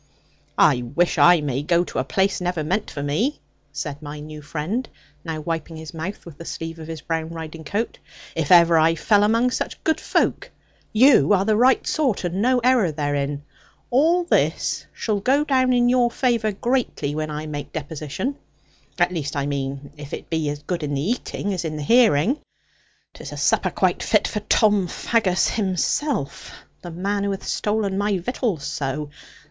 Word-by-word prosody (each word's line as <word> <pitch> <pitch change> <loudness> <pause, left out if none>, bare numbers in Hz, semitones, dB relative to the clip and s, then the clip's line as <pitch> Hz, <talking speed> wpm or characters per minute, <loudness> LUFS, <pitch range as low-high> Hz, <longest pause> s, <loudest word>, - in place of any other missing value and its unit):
'I 125 - +5
wish 175 0 +2
I 175 -2 +7
may 140 -2 -1
go 170 +3 +2
to - - -4
a - - +1
place 195 -1 0
never 175 -3 -1
meant 190 +7 -1
for 140 - -5
me,' 210 - 0 0.3
said 145 -2 -5
my 150 0 -7
new 150 0 -9
friend, 170 - -3 0.3
now 160 -2 -4
wiping 165 0 -4
his 160 0 -9
mouth 165 +5 -6
with 165 -4 -12
the - - -7
sleeve 165 0 -6
of 160 - -8
his 160 -2 -6
brown 160 0 -3
riding 160 -1 -7
coat, 205 +9 -3 0.4
'if 160 -1 -1
ever 170 -2 +7
I 165 +1 +4
fell 205 +6 +3
among 230 +4 +3
such - - -4
good 320 - +1
folk. - - 0 0.4
You 220 - +5
are 195 0 +2
the 215 0 +3
right 250 +4 +4
sort, 265 -12 0
and 180 +2 -2
no 255 +2 +3
error 245 -9 +3
therein. 145 -1 -2 0.5
All 325 +8 +4
this 345 - 0
shall 215 -3 -2
go 270 +8 +2
in 255 -2 +3
your 245 -1 +3
favour 235 -3 +1
greatly, 225 - -1
when 155 0 -3
I 150 +1 -4
make 145 -2 -6
deposition. 155 - -4 0.6
At - - +2
least, 150 -5 -3
I 140 -1 -1
mean, 140 0 -4
if 145 -1 -6
it - - -12
be 160 -2 0
as 145 0 -5
good 175 +2 -3
in 145 -1 -2
the 150 +10 0
eating 205 -4 -3
as 180 - -3
in 155 -2 -4
the 150 - -4
hearing. 230 - +4 0.7
'Tis - - -9
a - - -7
supper - - +2
quite - - 0
fit - - +2
for 210 - -3
Tom 210 -2 +3
Faggus 190 -1 +1
himself, 200 - -1 0.3
the 175 - -8
man 200 +4 -2
who 200 - 0
hath 195 -1 -4
stolen 210 -2 -1
my 205 -1 +1
victuals 195 - -2
so. 145 0 -3
175 Hz, 185 wpm, -22 LUFS, 150-220 Hz, 0.7 s, I